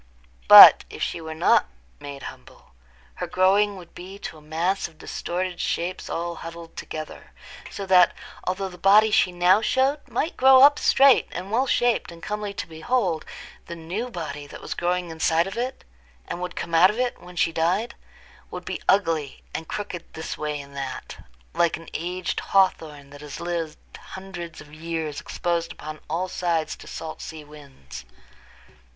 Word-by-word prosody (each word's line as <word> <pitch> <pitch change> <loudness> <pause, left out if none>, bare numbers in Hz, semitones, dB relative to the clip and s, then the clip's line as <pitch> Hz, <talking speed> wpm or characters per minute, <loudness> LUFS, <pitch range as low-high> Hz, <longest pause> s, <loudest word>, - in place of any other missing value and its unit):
But, - - +11
if - - -6
she 170 - -3
were 160 0 -7
not 160 - +3 0.3
made 140 -1 -9
humble, 65 - -12 0.5
her - - -4
growing 200 +2 +3
would 175 -2 -13
be 190 +2 -10
to 165 - -8
a - - -19
mass 165 +6 -1
of 160 -2 -21
distorted 180 +2 -4
shapes 180 +2 -3
all 170 0 -3
huddled 165 0 -10
together; 155 -1 -8 0.4
so 200 - -6
that, 180 -2 +5 0.3
although 190 +1 -2
the 180 -1 -13
body 210 +4 +5
she 185 - +3
now 180 +3 +4
showed 265 +6 +1
might 270 +6 -2
grow 265 0 +7
up 290 +1 +7
straight 270 -1 +5
and 185 +3 -6
well 255 +4 +1
shaped 240 -6 +1
and 170 0 -14
comely 210 -1 -4
to 200 - -5
behold, 165 +1 -1 0.4
the 170 - -6
new 180 +9 -5
body 150 -7 -6
that - - -10
was - - -5
growing 175 0 -2
inside 160 +1 +1
of 195 - -6
it, 250 +2 -4 0.4
and 175 - -5
would 180 0 -5
come 170 - -6
out 170 +3 +7
of 210 - -4
it 250 -1 -2
when 180 0 -13
she 170 - +1
died, 180 +8 0 0.6
would - - -8
be - - -5
ugly, 165 -8 +1
and 160 - -5
crooked 190 -5 -5
this 160 - -5
way 150 -1 -4
and 140 0 -12
that, 135 -2 -7 0.3
like 170 -1 +1
an 165 - -14
aged 180 +2 -3
hawthorn 155 -7 0
that 145 0 -12
has 150 -1 -8
lived 170 -3 -4 0.2
hundreds 175 -4 -9
of 150 -1 -15
years 160 -2 -4
exposed 170 -1 -2
upon 155 0 -8
all 175 +4 -1
sides 170 -3 -1
to - - -14
salt 160 -1 -7
sea 160 -2 -8
winds. 140 - -12
175 Hz, 175 wpm, -24 LUFS, 160-195 Hz, 0.6 s, But